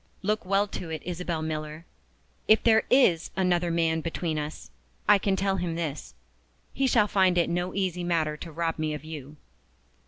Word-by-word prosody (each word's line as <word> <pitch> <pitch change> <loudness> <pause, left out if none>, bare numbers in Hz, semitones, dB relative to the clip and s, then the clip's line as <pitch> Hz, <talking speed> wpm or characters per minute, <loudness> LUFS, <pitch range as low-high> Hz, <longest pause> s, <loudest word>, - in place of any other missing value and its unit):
Look 215 +2 0
well 195 +2 +2
to 185 -4 -7
it, 160 -1 -5
Isabel 175 -2 -3
Miller. 155 +1 -5 0.6
If 215 - +5
there 220 -1 +4
is 185 -11 +4
another 180 -2 +2
man 165 -1 +1
between 165 -1 -2
us, 150 +1 -7 0.4
I 205 -1 +6
can 195 0 +1
tell 195 0 0
him 175 -2 -2
this 155 -4 -5 0.6
he 270 - +1
shall 220 -5 +4
find 190 -3 +3
it 170 -1 +2
no 175 +1 -2
easy 185 -3 -1
matter 160 -3 0
to 165 +2 -9
rob 165 0 -2
me 155 -1 -1
of 150 - -8
you!" 150 -2 -8
170 Hz, 180 wpm, -27 LUFS, 160-190 Hz, 0.6 s, I